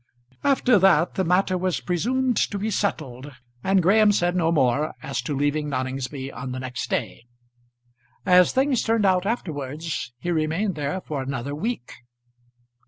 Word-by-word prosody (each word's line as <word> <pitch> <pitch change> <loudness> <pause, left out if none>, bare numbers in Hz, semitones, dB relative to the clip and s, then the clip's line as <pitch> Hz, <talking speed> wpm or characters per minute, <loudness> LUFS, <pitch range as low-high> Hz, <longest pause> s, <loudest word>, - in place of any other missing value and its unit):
After 260 -5 +4
that 180 -3 +4
the 190 - 0
matter 185 +2 +2
was 185 -1 -1
presumed 245 +8 0
to 205 - -4
be 215 +2 -2
settled, 145 -9 -3 0.3
and 190 -1 +3
Graham 210 +4 +5
said 175 -3 +1
no 165 -2 +2
more 145 0 +1
as 135 -2 -3
to 140 +4 -3
leaving 145 +1 0
Noningsby 130 +1 -4
on 125 +2 -6
the 130 - -4
next 125 -2 -5
day. 120 - -3 1.0
As 180 -1 +6
things 265 -1 +2
turned 225 -2 +1
out 185 0 +2
afterwards 155 - -4
he 175 +8 -3
remained 165 +5 0
there 150 +5 -3
for 150 -5 -4
another 135 +1 -4
week. 205 - -4
165 Hz, 155 wpm, -24 LUFS, 140-195 Hz, 1.0 s, As